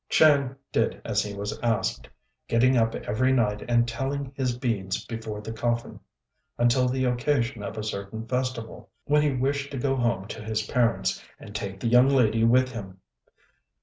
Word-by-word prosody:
Chang 140 -4 +4 0.2
did 115 - 0
as 105 -2 +1
he 100 0 -5
was 100 +1 -4
asked, 115 -5 -1 0.4
getting 125 +3 +3
up 115 -1 +2
every 130 +5 0
night 105 -5 +1
and 120 0 +3
telling 135 +3 -3
his 125 -3 -1
beads 105 -6 -2
before 110 -2 -5
the 110 +1 -6
coffin, 120 +1 -2 0.6
until 120 +2 +3
the 130 +1 0
occasion 120 -2 0
of 100 +2 -6
a 110 - -3
certain 105 +1 -5
festival, 125 -2 -3 0.2
when 150 +1 +3
he 150 -2 +2
wished 140 +2 -1
to - - -3
go 135 +1 0
home 115 -6 0
to 110 - -6
his 110 0 -1
parents, 115 0 +1 0.2
and 105 - -11
take 100 -3 -5
the 115 - -2
young 125 +3 +6
lady 115 -5 +3
with 130 +2 +4
him. 95 -6 -8
120 Hz, 175 wpm, -26 LUFS, 110-130 Hz, 0.6 s, young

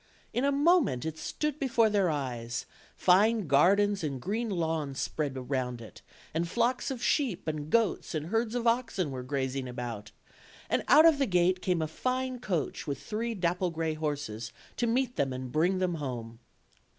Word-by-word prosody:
In 245 - 0
a 280 - +3
moment 285 - +3
it 160 0 -4
stood 300 -1 -3
before 240 -4 +3
their 200 -4 +2
eyes; 120 -6 -3 0.3
fine 210 +3 +4
gar 150 +7 +5
dens 205 -2 +1
and 140 -4 -2
green 220 - -2
lawns 160 -6 -2
spread 145 -4 -2
round 125 -2 -1
it, 115 - -12 0.3
and 165 +2 0
flocks 235 +6 +1
of 255 -3 -4
sheep 255 - 0
and 155 -1 -3
goats 225 -6 +1
and 155 -1 -2
herds 225 +2 0
of 240 -1 -1
oxen 230 - +1
were 130 -1 -4
grazing 130 0 -2
about; 120 -4 -5 0.6
and - - +2
out 310 +2 +8
of 320 -4 +6
the 275 - +2
gate 180 -1 +2
came 180 -4 +1
a - - -1
fine 255 +8 -2
coach 175 - -2
with 140 - -2
three 230 +2 -3
aapple 180 -1 0
gray 160 -1 -1
horses 145 -8 -4 0.3
to 240 - +1
meet 250 +1 0
them 135 -1 +1
and 130 -1 -5
bring 175 +6 +2
them 185 -1 0
home. 120 -7 -5
175 Hz, 180 wpm, -29 LUFS, 140-230 Hz, 0.6 s, out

